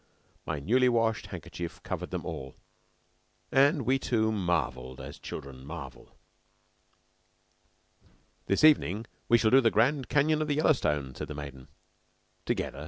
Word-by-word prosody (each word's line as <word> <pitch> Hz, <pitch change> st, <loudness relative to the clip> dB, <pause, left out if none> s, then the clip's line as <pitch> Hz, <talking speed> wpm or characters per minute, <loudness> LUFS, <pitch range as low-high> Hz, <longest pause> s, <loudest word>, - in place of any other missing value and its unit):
My 80 Hz, -2 st, -2 dB
newly 125 Hz, -, +3 dB
washed 115 Hz, -3 st, +1 dB
handkerchief 85 Hz, -1 st, -7 dB
covered -, -, -4 dB
them -, -, -4 dB
all, 65 Hz, -1 st, -6 dB, 1.0 s
and 140 Hz, +2 st, +4 dB
we 130 Hz, +4 st, +2 dB
two 110 Hz, -4 st, +1 dB
marvelled 75 Hz, -, -2 dB
as -, -, -9 dB
children 70 Hz, -3 st, -8 dB
marvel. 70 Hz, -4 st, -9 dB, 2.3 s
"This 100 Hz, -, +1 dB
evening 115 Hz, -, +4 dB, 0.2 s
we 120 Hz, -, +7 dB
shall 110 Hz, -1 st, +2 dB
do 135 Hz, +1 st, +7 dB
the 115 Hz, -, +4 dB
Grand 130 Hz, +5 st, +1 dB
Canyon 150 Hz, +1 st, +2 dB
of 155 Hz, -, -1 dB
the 145 Hz, -, 0 dB
Yellowstone," 75 Hz, -, +1 dB
said -, -, -6 dB
the 75 Hz, -, -7 dB
maiden. 70 Hz, -3 st, -8 dB, 0.8 s
"Together?" -, -, -2 dB
110 Hz, 135 wpm, -29 LUFS, -, 2.3 s, we